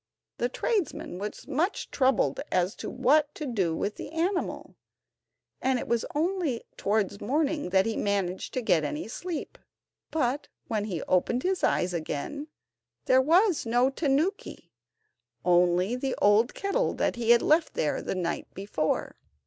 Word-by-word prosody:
The 240 - +1
tradesman 365 - -2
was 205 +1 -6
much 310 +8 -1
troubled 265 -1 +2
as 185 +2 +1
to - - -5
what 295 +2 +2
to 305 - -5
do 195 - 0
with 205 - -2
the - - -6
animal, 350 +4 -2 0.9
and 260 0 +2
it - - -5
was 235 -1 +1
only 320 -6 0
towards 200 -1 0
morning 295 - 0
that 190 +1 +3
he 225 -1 -1
managed 195 -3 -1
to 255 - -1
get 165 -7 +3
any 300 - -3
sleep; 335 +7 -5 0.5
but 290 -2 -1 0.2
when 215 -2 -1
he 180 -7 -3
opened 235 +7 +1
his 375 0 0
eyes 180 0 +2
again 170 - -4 0.6
there 260 0 +5
was 350 +5 +3
no 245 +3 +3
tanuki, 305 +7 -1 0.7
only 180 +4 +3
the 260 +1 -2
old 210 +4 +4
kettle 400 +6 0 0.2
he 235 -1 -3
had 235 0 +6
left 315 +2 +3
there 150 - 0
the - - -3
night 170 -2 -3
before. 190 -5 -2
245 Hz, 150 wpm, -28 LUFS, 195-305 Hz, 0.9 s, had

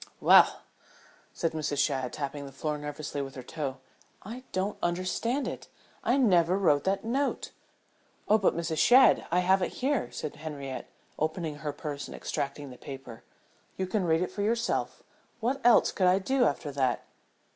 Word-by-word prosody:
"Well," - - +6 0.7
said 165 - -1
Mrs. 150 -2 -2
Shadd, 130 -2 0
tapping 140 -1 -4
the - - -10
floor 150 +3 -3
nervously 145 0 -5
with 135 -1 -6
her 130 - -7
toe. 140 -4 -4 0.5
"I 230 +6 -7
don't 190 +2 -2
understand 185 +10 -1
it. - - -6 0.4
I 250 - +2
never 185 -8 +4
wrote 150 -7 +3
that 195 +3 0
note." 270 +5 -1 0.8
"Oh, 215 +1 +5
but 190 - +2
Mrs. 165 -2 -2
Shadd 255 +2 +6
I 180 +2 +2
have 190 +1 +3
it - - -1
here," 270 -1 -1
said 150 - -6
Henriette, 145 -3 -6 0.3
opening 155 -1 -2
her 150 0 -4
purse 145 0 -6
and - - -9
extracting 140 0 -4
the 125 - -12
paper. 135 -4 -9 0.5
"You 190 - -1
can 185 0 -1
read 165 +1 +2
it 180 - -4
for 205 - -4
yourself. 230 +3 -1 0.4
What 255 +4 -1
else 240 0 +6
could 185 - +2
I 180 +1 +5
do 250 +6 +2
after 145 0 -1
that?" 130 -3 0
165 Hz, 170 wpm, -29 LUFS, 145-205 Hz, 0.8 s, Well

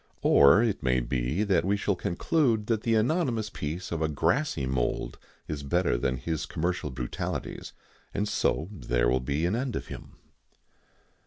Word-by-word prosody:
Or 70 +11 +6
it 110 -4 0
may 65 0 +2
be 65 - -1 0.2
we 100 +3 +1
shall 100 0 0
conclude 110 - +1
that 110 -1 0
the 115 0 +1
anonymous 115 -3 +1
peace 80 +5 -5
of 85 -2 -2
a 80 - +2
grassy 80 - 0
mould 65 -2 -2 0.3
is 75 -2 -4
better 85 +2 +1
than 65 +1 0
his 80 +5 -3
commercial 85 -2 -2
brutalities, 65 -2 -5 0.4
and 105 - -1
so 80 -5 0
there - - 0
will 65 +2 +2
be 70 +6 -1
an 90 +5 +1
end 125 -1 -2
of - - -5
him. - - -9
85 Hz, 160 wpm, -28 LUFS, 65-105 Hz, 0.4 s, Or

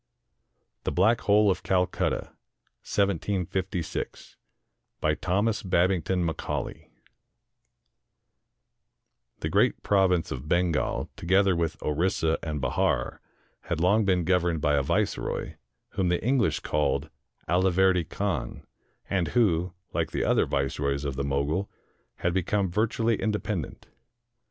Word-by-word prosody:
THE - - -1
BLACK 110 +6 +3
HOLE 105 0 +4
OF - - -2
CALCUTTA 90 -1 0 2.7
BY 75 - +2
THOMAS 100 +6 +1
BABINGTON 90 -1 +1
MACAULAY 80 - -4 2.5
The - - -1
great - - +2
province 95 -4 +2
of 65 +4 -6
Bengal, 85 -3 0
together 95 +1 +3
with 85 -1 -1
Orissa 80 +1 +1
and 75 -2 -3
Bahar, 70 -2 0 0.4
had 85 - -2
long 100 +6 +3
been 90 -3 +2
governed 90 -1 +1
by 75 0 +1
a 70 - +3
viceroy, 70 - -1 0.4
whom 95 -2 0
the 90 - 0
English 125 -3 +2
called 75 0 0 0.4
Aliverdy 90 -1 +3
Khan, 100 -2 -3 0.4
and 90 -4 0
who, 90 -4 +1 0.2
like - - 0
the - - -2
other - - +2
viceroys 70 +1 -1
of 70 -2 -2
the 70 - -2
Mogul, 70 +8 -1 0.5
had 85 - -1
become 95 +1 0
virtually 115 +3 +1
in 110 - +1
dependent. 100 -6 -3
90 Hz, 115 wpm, -27 LUFS, 80-100 Hz, 2.7 s, HOLE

